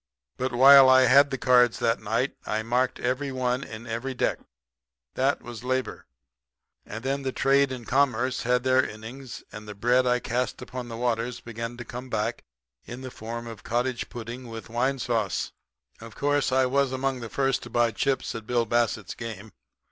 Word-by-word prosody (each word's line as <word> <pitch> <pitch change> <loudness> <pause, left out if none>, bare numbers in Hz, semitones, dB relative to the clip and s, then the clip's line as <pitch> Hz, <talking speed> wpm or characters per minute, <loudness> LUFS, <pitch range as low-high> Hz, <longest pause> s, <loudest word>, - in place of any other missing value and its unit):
But 130 +1 -2
while 135 +2 +8
I 130 0 +7
had 140 +3 +6
the 135 - -3
cards 125 -2 +4
that 115 0 0
night 115 +5 -1
I 110 +1 -1
marked 125 +3 0
every 130 +3 -1
one 130 0 -1
in 115 -1 -9
every 120 +3 -4
deck. - - 0 0.7
That 135 +2 0
was 120 -1 -8
labor. 130 0 -2 0.8
And 110 +3 -7
then 135 +1 -1
trade 140 +1 +3
and 125 -3 -7
commerce 130 -2 +1
had 125 0 +1
their 130 0 +4
innings, 120 +4 -8
and 105 0 -9
the 105 - -7
bread 125 +5 +2
I 125 - +4
had 125 - -2
cast 125 +2 -2
upon 125 -1 -7
the 115 -1 -7
waters 120 0 -1
began 115 +1 -6
to 120 - -7
come 125 +2 -8
back 115 0 -2 0.4
in 120 - -8
the 130 -1 -7
form 115 +1 -6
of 115 -3 -9
cottage 120 +1 -1
pudding 120 +2 -7
with 115 -1 -9
wine 130 +4 0
sauce. 115 -7 -1 0.5
"Of 115 -1 -11
course 145 -1 +1
I 130 0 +3
was 135 +1 +1
among 130 0 -1
the 115 -2 -7
first 135 +1 0
to 120 - -9
buy 120 0 +2
chips 135 +5 -1
at 115 -1 -7
Bill 120 -1 +1
Bassett's 115 -1 0
game. 110 -2 -8
125 Hz, 185 wpm, -26 LUFS, 115-130 Hz, 0.8 s, while